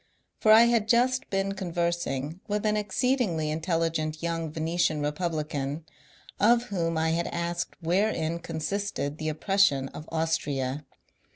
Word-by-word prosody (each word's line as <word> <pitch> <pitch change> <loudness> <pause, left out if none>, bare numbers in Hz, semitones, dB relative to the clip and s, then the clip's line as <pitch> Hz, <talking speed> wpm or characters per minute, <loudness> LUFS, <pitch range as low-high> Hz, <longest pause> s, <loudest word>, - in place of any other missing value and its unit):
For 215 - +4
I 220 +1 +9
had 235 -2 +2
just 250 +3 +2
been 195 0 0
conversing 170 -5 -2
with 210 0 -1
an 210 0 +2
exceedingly 210 - 0
intelligent 160 -1 -1
young 165 -2 -2
Venetian 160 0 0
Eepublican, 150 -2 -2 0.6
of 235 +3 +5
whom 165 -4 -1
I 160 0 +1
had 170 +1 0
asked 170 +1 -3
wherein 170 -2 +1
consisted 165 -2 -3
the 155 0 -1
oppression 155 -4 +2
of 150 - -10
Austria. 145 -4 -1
165 Hz, 125 wpm, -27 LUFS, 155-195 Hz, 0.6 s, I